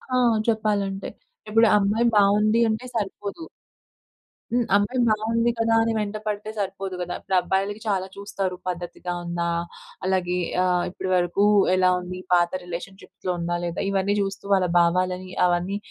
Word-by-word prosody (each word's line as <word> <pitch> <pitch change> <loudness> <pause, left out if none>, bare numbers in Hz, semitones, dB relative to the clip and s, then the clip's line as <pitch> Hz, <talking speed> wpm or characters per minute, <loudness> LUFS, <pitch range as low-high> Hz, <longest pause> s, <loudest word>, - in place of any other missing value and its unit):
ఆ! - - +4 0.3
చెప్పాలంటే. 205 -3 0 0.4
ఇప్పుడు 225 +2 +5
అమ్మాయి 210 +4 +2
బాగుంది, 210 +2 +4
అంటే 220 +3 -2
సరిపోదు. 205 - -4 1.1
హ్మ్, 245 0 +3
అమ్మాయి 205 +6 +1
బాగుంది 225 +2 +1
కదా! 225 0 +2
అని 225 0 0
వెంట 210 -1 -2
పడితే 210 0 -3
సరిపోదు 195 -1 -3
కదా! 175 0 -3
ఇప్పుడు 190 - -2
అబ్బాయిలకి 195 +3 -1
చాలా 190 -2 0
చూస్తారు. 200 -2 -3
పద్ధతిగా 175 0 -4
ఉందా? 170 0 -2 0.6
అలాగే 185 -1 0 0.3
ఆహ్, 180 -1 +2
ఇప్పటి 185 +1 -5
వరకు 175 +2 +1 0.3
ఎలా 185 0 +4
ఉంది? 180 0 -7
పాత 175 -1 +4
రిలేషన్షిప్స్‌లో 180 +1 -6
ఉందా? 175 0 -1
లేదా? 170 0 -4
ఇవన్నీ 200 +1 +1
చూస్తూ 195 0 -4
వాళ్ళ 190 -2 +3
భావాలని 180 +2 +1 0.2
అవన్నీ 180 +3 0
195 Hz, 140 wpm, -24 LUFS, 180-210 Hz, 1.1 s, ఇప్పుడు